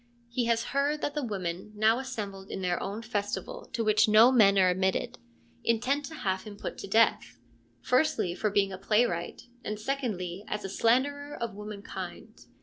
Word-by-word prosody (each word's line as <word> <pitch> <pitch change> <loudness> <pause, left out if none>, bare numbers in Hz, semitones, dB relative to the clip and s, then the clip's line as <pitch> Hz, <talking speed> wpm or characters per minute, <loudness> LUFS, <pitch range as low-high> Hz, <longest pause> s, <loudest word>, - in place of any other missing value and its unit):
He 240 0 -1
has 230 0 +2
heard 285 +2 +1
that 290 - -1
the 295 - -2
women, 190 -2 -4
now 220 +3 +3
assembled 205 -7 -6
in 190 - -5
their 180 -1 0
own 205 +4 -4
festival 205 -4 -4
to 230 - -1
which 215 0 +4
no 220 +4 +7
men 205 -6 +5
are 185 -1 +5
admitted, 190 +1 -1 0.4
intend 255 +6 +1
to 315 - -8
have 190 -9 -1
him 205 0 -10
put - - -6
to - - -6
death, 195 - +2 0.5
firstly 250 - +2
for 215 +4 -1
being 200 -1 +2
a 190 - -7
playwright 210 -5 0 0.2
and 210 0 -4
secondly 210 -8 -3
as 210 -1 -3
a - - -4
slanderer 285 +8 +1
of 235 -2 -4
womenkind. 210 0 -8
215 Hz, 175 wpm, -29 LUFS, 195-245 Hz, 0.5 s, no